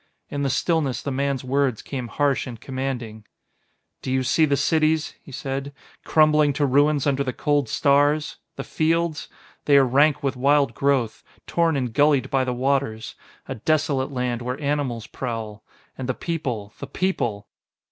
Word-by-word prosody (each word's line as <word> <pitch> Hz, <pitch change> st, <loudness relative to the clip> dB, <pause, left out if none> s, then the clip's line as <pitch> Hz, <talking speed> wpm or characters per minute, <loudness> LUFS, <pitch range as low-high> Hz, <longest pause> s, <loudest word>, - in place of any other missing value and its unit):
In 145 Hz, -, -3 dB
the 140 Hz, -, 0 dB
stillness 150 Hz, -2 st, 0 dB
the 140 Hz, -, -3 dB
man's 140 Hz, 0 st, -1 dB
words 130 Hz, -3 st, 0 dB
came 130 Hz, -4 st, -5 dB
harsh 140 Hz, +3 st, 0 dB
and 120 Hz, -3 st, -8 dB
commanding 125 Hz, -4 st, -5 dB, 0.8 s
"Do 130 Hz, -, -4 dB
you 130 Hz, 0 st, +1 dB
see 155 Hz, +5 st, +3 dB
the 140 Hz, -2 st, +1 dB
cities," 155 Hz, 0 st, +1 dB
he -, -, -14 dB
said, 135 Hz, +2 st, -5 dB, 0.3 s
"crumbling 155 Hz, -2 st, +4 dB
to 145 Hz, +1 st, +1 dB
ruins 145 Hz, +1 st, +3 dB
under 140 Hz, -1 st, +1 dB
the 130 Hz, -, -2 dB
cold 145 Hz, -5 st, 0 dB
stars? 145 Hz, +3 st, +2 dB, 0.2 s
The -, -, -5 dB
fields? 165 Hz, 0 st, 0 dB, 0.4 s
They 145 Hz, -1 st, +5 dB
are 135 Hz, -, +6 dB
rank 145 Hz, +4 st, +3 dB
with 135 Hz, -1 st, 0 dB
wild 140 Hz, 0 st, +2 dB
growth, 135 Hz, -4 st, 0 dB, 0.2 s
torn 165 Hz, -3 st, +1 dB
and 125 Hz, -4 st, -2 dB
gullied 145 Hz, 0 st, +3 dB
by 135 Hz, -1 st, +2 dB
the 130 Hz, -, -2 dB
waters; 125 Hz, -3 st, -1 dB, 0.3 s
a -, -, -3 dB
desolate 140 Hz, +1 st, 0 dB
land 125 Hz, -2 st, -2 dB
where 125 Hz, +2 st, -4 dB
animals 140 Hz, -6 st, -2 dB
prowl. 115 Hz, -4 st, -6 dB, 0.3 s
And 130 Hz, -1 st, -6 dB
the 130 Hz, -, 0 dB
people 125 Hz, -, -4 dB
the 140 Hz, -, -6 dB
people! 120 Hz, -, -2 dB
140 Hz, 165 wpm, -23 LUFS, 125-145 Hz, 0.8 s, are